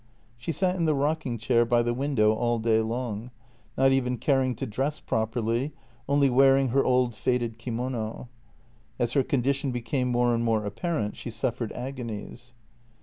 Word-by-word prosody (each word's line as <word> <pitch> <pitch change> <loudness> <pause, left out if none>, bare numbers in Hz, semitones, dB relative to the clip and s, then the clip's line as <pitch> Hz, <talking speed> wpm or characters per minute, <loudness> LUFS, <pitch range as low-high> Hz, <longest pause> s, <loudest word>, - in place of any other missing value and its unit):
She 120 +7 -4
sat 185 +2 +1
in 170 - +1
the 155 -2 +2
rocking 140 -3 -1
chair 115 +2 +3
by 120 0 +2
the 120 0 0
window 120 -5 +2
all 120 +1 0
day 110 -1 +2
long, 115 0 -3 0.5
not 135 0 +4
even 125 -2 +1
caring 130 -2 +1
to - - -4
dress 135 +8 -2
properly, 115 +5 -1 0.4
only 140 0 +4
wearing 135 +1 +4
her 135 +3 +3
old 125 -1 +2
faded 120 0 -1
kimono. 120 -1 -4 0.7
As 120 0 0
her 140 - +4
condition 135 +1 0
became 125 +2 -1
more 120 0 +2
and 115 0 0
more 110 -2 +1
apparent 110 - -2
she - - -6
suffered 115 +1 -2
agonies. 120 -2 -7
125 Hz, 160 wpm, -27 LUFS, 115-135 Hz, 0.7 s, not